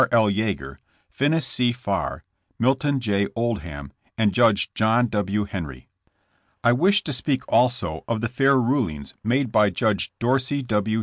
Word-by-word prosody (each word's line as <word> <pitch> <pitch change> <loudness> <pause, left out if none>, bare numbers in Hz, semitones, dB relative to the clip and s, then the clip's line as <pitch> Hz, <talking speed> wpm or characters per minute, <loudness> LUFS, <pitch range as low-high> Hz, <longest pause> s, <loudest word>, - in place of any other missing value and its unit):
L. 110 -3 +4
Yeager, 95 -10 -3 0.3
Finis 150 +3 +1
C. 125 -1 +1
Farr, 110 -5 -3 0.3
Milton 135 +3 +1
J. 100 -4 0
Oldham 90 - -4 0.2
and 105 -3 +2
Judge 110 -3 +2
John 110 +3 +2
W. 105 0 -1
Henry. 80 -11 -7 0.7
I 120 - +5
wish 190 +9 +3
to 150 - -3
speak 130 +1 -1
also 115 -11 +1
of 115 -1 -1
the 120 - -1
fair 135 +2 +3
rulings 115 - -1
made 125 +2 0
by 105 -1 +4
Judge 100 +3 -1
Dorsey 130 +3 0
W. 110 -1 0
115 Hz, 145 wpm, -23 LUFS, 100-130 Hz, 0.7 s, I